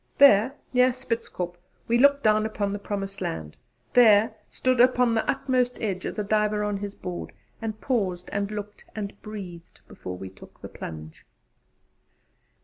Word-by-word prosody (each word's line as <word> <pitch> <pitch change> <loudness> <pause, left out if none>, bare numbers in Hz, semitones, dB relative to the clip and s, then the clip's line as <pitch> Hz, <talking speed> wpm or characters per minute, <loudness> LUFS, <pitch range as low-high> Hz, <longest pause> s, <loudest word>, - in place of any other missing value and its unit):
There, 260 -1 +6 0.2
near 250 0 +5
Spitzkop, 230 -8 -4 0.3
we 235 +1 +3
looked 280 +1 +5
down 215 0 +4
upon 205 -2 -2
the 205 - -3
promised 195 -1 -5
land; 80 -2 -4 0.4
there, 220 -3 +6 0.2
stood 255 -1 0
upon 250 -1 +4
the 225 - 0
outmost 255 -2 +1
edge, 190 -4 -2
as - - -6
a 210 - 0
diver 210 0 +1
on 205 -1 -1
his 200 0 -6
board, 180 -1 -6 0.3
and 220 -1 -4
paused 190 -8 -1
and 200 0 -1
looked 210 0 -7
and 205 -2 -4
breathed 185 -6 -9
before 90 0 -7
we 95 +1 -7
took 95 - -16
the - - -9
plunge. 80 -1 -9
210 Hz, 155 wpm, -26 LUFS, 195-240 Hz, 0.4 s, There